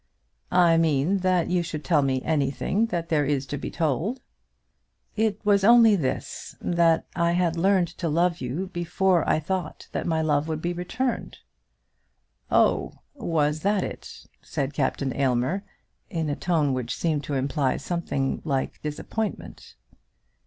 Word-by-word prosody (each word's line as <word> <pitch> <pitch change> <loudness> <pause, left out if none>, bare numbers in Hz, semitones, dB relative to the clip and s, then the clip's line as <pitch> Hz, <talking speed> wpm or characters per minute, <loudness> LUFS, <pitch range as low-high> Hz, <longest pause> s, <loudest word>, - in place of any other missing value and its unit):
"I 175 -2 +5
mean 165 +3 +2
that 185 -2 +1
you 180 -1 +2
should 160 -3 -5
tell 160 -5 +3
me 130 -2 0
anything 155 +8 0
that 170 -5 -3
there 150 -2 +2
is 140 -1 0
to 140 - -4
be - - -4
told." 165 - -1 1.0
"It 215 -2 0
was 200 -1 +4
only 230 -1 +7
this, 145 -9 -3
that 170 -2 +2
I 170 0 +2
had 175 -2 +1
learned 180 0 +2
to 170 - -1
love 170 +2 +1
you 150 +10 -3
before 175 0 +1
I - - +3
thought 175 +1 -4
that - - -3
my 160 -1 +1
love 150 -1 +1
would 160 -1 -2
be 175 +2 -2
returned." 225 +9 -3 1.1
"Oh; - - +2 0.2
was 155 - 0
that 200 +3 +1
it?" - - -8 0.2
said 140 -2 -3
Captain 135 -1 -1
Aylmer, 135 +8 0 0.5
in 165 -6 -2
a - - -1
tone 155 -6 +1
which 125 -3 -3
seemed 155 -4 -1
to 145 - -3
imply 135 0 0
something 160 -6 -2
like 135 -4 -2
disappointment. 175 +8 -5
165 Hz, 150 wpm, -25 LUFS, 145-180 Hz, 1.1 s, only